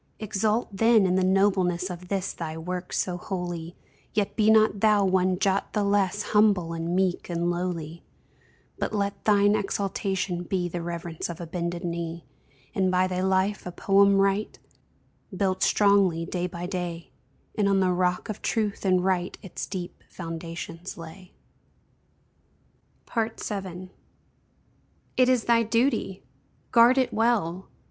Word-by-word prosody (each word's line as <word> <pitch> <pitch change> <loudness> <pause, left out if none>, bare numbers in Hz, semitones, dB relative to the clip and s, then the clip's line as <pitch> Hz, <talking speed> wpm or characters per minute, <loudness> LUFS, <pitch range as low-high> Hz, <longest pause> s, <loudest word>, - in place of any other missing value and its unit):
Exult 215 0 -1
then 225 0 +5
in 180 - +2
the 185 0 +2
nobleness 185 -1 +2
Of 180 0 -8
this 195 0 -2
thy 160 -1 -5
work 180 +2 -5
so 180 -1 -1
holy, 175 -2 -5 0.4
Yet 205 -2 0
be 215 -1 +3
not 215 -2 +4
thou 210 -1 +4
one 185 -1 +2
jot 195 +1 0
the 210 - +1
less 200 0 +1
Humble 200 -6 +3
and 165 +1 -2
meek 185 -1 0
and 170 0 0
lowly, 170 -2 -4 0.8
But - - -2
let 200 -1 -2
thine 205 -1 +4
exultation 195 -3 -2
be 180 0 -1
The 175 0 -4
reverence 170 -1 -5
of 170 0 -6
a 170 - -5
bended 170 +1 -4
knee; 170 -1 -4 0.5
And 190 -1 +1
by 185 0 +3
thy 185 0 -2
life 190 +1 0
a - - -4
poem 200 +2 +4
write, 195 +2 +1 0.8
Built 190 -1 0
strongly 195 -5 +3
day 180 0 -2
by 175 -1 -6
day 175 -2 -5 0.4
And 205 -2 +1
on 195 -1 +3
the 185 -1 +2
rock 180 0 0
of 215 - -6
Truth 215 -3 -1
and 185 -2 +2
Right 185 -2 0
Its 190 - -6
deep 180 -3 -6
foundations 165 +1 -7
lay. 175 +3 -11 1.8
VII. 195 -5 -3 1.2
It 255 0 +4
is 250 -3 +3
thy 235 -1 +4
|DUTY|! 230 -4 0 0.5
Guard 240 +2 +6
it 260 -2 +1
well! 210 -6 0
185 Hz, 145 wpm, -26 LUFS, 175-205 Hz, 1.8 s, Guard